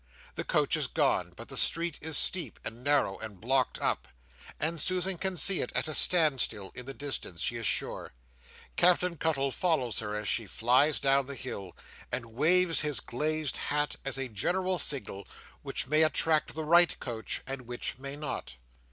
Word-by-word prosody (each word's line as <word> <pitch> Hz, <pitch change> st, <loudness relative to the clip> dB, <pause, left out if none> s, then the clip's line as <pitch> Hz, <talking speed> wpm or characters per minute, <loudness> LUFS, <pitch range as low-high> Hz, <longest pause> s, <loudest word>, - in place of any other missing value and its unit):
The -, -, -5 dB
coach -, -, +1 dB
is -, -, -1 dB
gone, -, -, 0 dB
but -, -, -11 dB
the -, -, -7 dB
street 165 Hz, -1 st, +1 dB
is 155 Hz, -2 st, +3 dB
steep, 170 Hz, -, +2 dB
and 115 Hz, +3 st, -7 dB
narrow, 145 Hz, -8 st, 0 dB
and 105 Hz, -4 st, -9 dB
blocked 130 Hz, +3 st, -1 dB
up, -, -, -2 dB, 0.5 s
and 160 Hz, 0 st, +1 dB
Susan 185 Hz, +1 st, +1 dB
can 190 Hz, -2 st, -2 dB
see 185 Hz, +5 st, +5 dB
it -, -, -4 dB
at -, -, 0 dB
a 155 Hz, -, -2 dB
stand 155 Hz, -6 st, +4 dB
still 100 Hz, -4 st, -2 dB
in 125 Hz, 0 st, -8 dB
the 135 Hz, -, -6 dB
distance, 135 Hz, -11 st, -4 dB
she 120 Hz, -, -1 dB
is 115 Hz, -3 st, -1 dB
sure. -, -, -2 dB, 0.6 s
Captain 180 Hz, 0 st, +3 dB
Cuttle 140 Hz, -4 st, 0 dB
follows 130 Hz, -, -1 dB
her 105 Hz, -1 st, -5 dB
as 105 Hz, -1 st, -4 dB
she 115 Hz, +1 st, +2 dB
flies 130 Hz, +9 st, +2 dB
down 135 Hz, -1 st, +2 dB
the 140 Hz, -, -6 dB
hill, 100 Hz, -9 st, -7 dB, 0.3 s
and 125 Hz, -1 st, -2 dB
waves 165 Hz, +5 st, +5 dB
his 150 Hz, -3 st, +2 dB
glazed 150 Hz, +2 st, -2 dB
hat 145 Hz, 0 st, 0 dB
as 135 Hz, -1 st, -1 dB
a 135 Hz, -1 st, -3 dB
general 180 Hz, -, -2 dB
signal, 100 Hz, -8 st, -1 dB, 0.3 s
which -, -, -2 dB
may 155 Hz, +4 st, +2 dB
attract 155 Hz, -1 st, +2 dB
the 160 Hz, -1 st, -5 dB
right 170 Hz, +1 st, +4 dB
coach 115 Hz, -3 st, -4 dB
and 135 Hz, -2 st, -6 dB
which 120 Hz, +1 st, -5 dB
may 140 Hz, +1 st, -6 dB
not. 145 Hz, -, -6 dB
140 Hz, 185 wpm, -28 LUFS, 120-160 Hz, 0.6 s, see